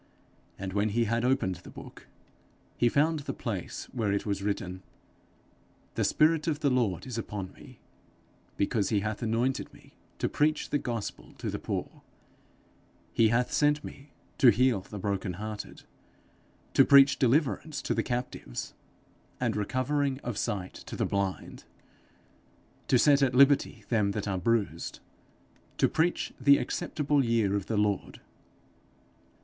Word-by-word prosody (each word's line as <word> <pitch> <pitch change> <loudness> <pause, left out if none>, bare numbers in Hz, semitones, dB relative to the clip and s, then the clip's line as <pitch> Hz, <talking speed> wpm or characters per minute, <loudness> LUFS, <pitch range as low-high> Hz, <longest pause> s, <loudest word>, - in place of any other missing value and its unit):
And 95 -1 -5
when 105 +1 +1
he 115 +3 +1
had 115 +1 0
opened 125 -8 +1
the 90 - -13
book, - - -12 0.7
he 120 - +3
found 155 +5 +2
the 140 - -5
place - - -5
where 110 -4 0
it 100 - -1
was 100 -2 -2
written, 95 -2 -3 1.1
'The - - 0
spirit 155 +1 +3
of 155 -2 -1
the 140 -3 +2
Lord 115 -9 0
is 125 -3 -4
upon 100 -4 -5
me, - - -15 0.8
because 100 0 0
he 105 -3 +1
hath 110 +2 -3
anointed 120 +3 -1
me - - -19 0.2
to - - 0
preach 150 +1 0
the 145 - +2
gospel 110 - -5
to - - -5
the - - -4
poor; - - -4 1.1
he 115 - +4
hath 120 +3 +1
sent 150 0 +2
me 140 +1 -10 0.3
to 130 - +8
heal 120 -2 +3
the 105 - -9
brokenhearted, 100 +2 -4 0.9
to - - +7
preach 140 0 +6
deliverance 145 +4 +1
to - - 0
the - - +1
captives, 125 - -4 0.7
and - - 0
recovering 130 +5 0
of 120 -3 -4
sight 95 -2 -3
to - - -9
the - - 0
blind, 100 -1 -3 1.2
to 125 - +4
set 140 +2 +5
at 130 -2 +2
liberty 140 +2 +4
them 105 -4 +2
that 105 0 -3
are 95 -2 -1
bruised, 100 -5 -1 0.8
to - - +4
preach 165 +2 0
the 140 +1 +7
acceptable 150 -4 0
year 115 -4 +1
of 100 -2 -3
the 110 - -1
Lord.' 105 -1 -1
115 Hz, 145 wpm, -29 LUFS, 100-140 Hz, 1.2 s, to